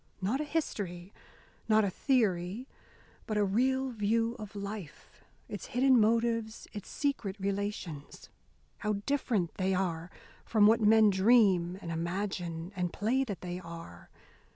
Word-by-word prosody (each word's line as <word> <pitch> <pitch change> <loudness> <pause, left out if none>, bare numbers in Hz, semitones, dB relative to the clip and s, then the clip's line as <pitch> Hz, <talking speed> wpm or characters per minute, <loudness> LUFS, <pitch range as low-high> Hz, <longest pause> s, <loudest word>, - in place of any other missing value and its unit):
Not 220 +10 0
a - - -2
history, 200 - -3 0.6
not 215 0 +5
a 195 - -1
theory, 215 -2 0 0.6
but 215 - -1
a 205 - +3
real 260 +6 +1
view 225 +1 0
of 210 -1 -8
life, 200 -5 -8 0.2
its - - -7
hidden 260 -2 +5
motives, 230 0 +1
its 205 - -7
secret 275 -9 -2
relations. 195 -6 -4 0.5
How 210 -2 0
different 235 - 0
they 190 0 +1
are 175 -2 -2 0.3
from 215 -2 +4
what 225 +2 +5
men 215 0 +6
dream 190 -4 +4
and 170 - -4
imagine 170 0 -3
and 180 -2 -1
play 240 +6 +1
that 200 -7 -5
they 180 0 -5
are! 165 - -10
205 Hz, 135 wpm, -31 LUFS, 180-230 Hz, 0.6 s, men